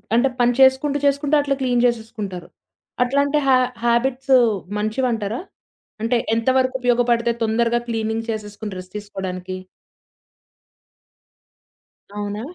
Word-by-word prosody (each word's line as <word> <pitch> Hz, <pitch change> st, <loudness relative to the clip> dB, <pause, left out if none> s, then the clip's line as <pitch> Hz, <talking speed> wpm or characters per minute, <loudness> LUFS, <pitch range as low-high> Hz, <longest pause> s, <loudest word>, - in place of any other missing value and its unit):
అంటే 240 Hz, +3 st, +4 dB
పని 245 Hz, 0 st, +4 dB
చేసుకుంటూ, 265 Hz, +2 st, +4 dB
చేసుకుంటూ 280 Hz, +1 st, +2 dB
అట్లా 280 Hz, -1 st, 0 dB
క్లీన్ 250 Hz, -2 st, +2 dB
జేసేసుకుంటారు. 220 Hz, -7 st, -3 dB, 0.6 s
అట్లాంటి 280 Hz, +3 st, +1 dB
హా 265 Hz, -, +6 dB, 0.3 s
హాబిట్సు 255 Hz, +3 st, +3 dB, 0.4 s
మంచివంటారా? 220 Hz, 0 st, -1 dB, 0.6 s
అంటే 230 Hz, +2 st, +1 dB, 0.2 s
ఎంతవరకు 260 Hz, +3 st, +1 dB
ఉపయోగపడితే 240 Hz, -1 st, +2 dB
తొందరగా 230 Hz, +2 st, +1 dB
క్లీనింగ్ 225 Hz, 0 st, -2 dB
చేసేసుకొని, 210 Hz, -1 st, -5 dB
రెస్ట్ 185 Hz, 0 st, -12 dB
తీసుకోడానికి? 190 Hz, -3 st, -6 dB, 2.6 s
అవునా? 205 Hz, 0 st, -4 dB
235 Hz, 95 wpm, -21 LUFS, 215-260 Hz, 2.6 s, హా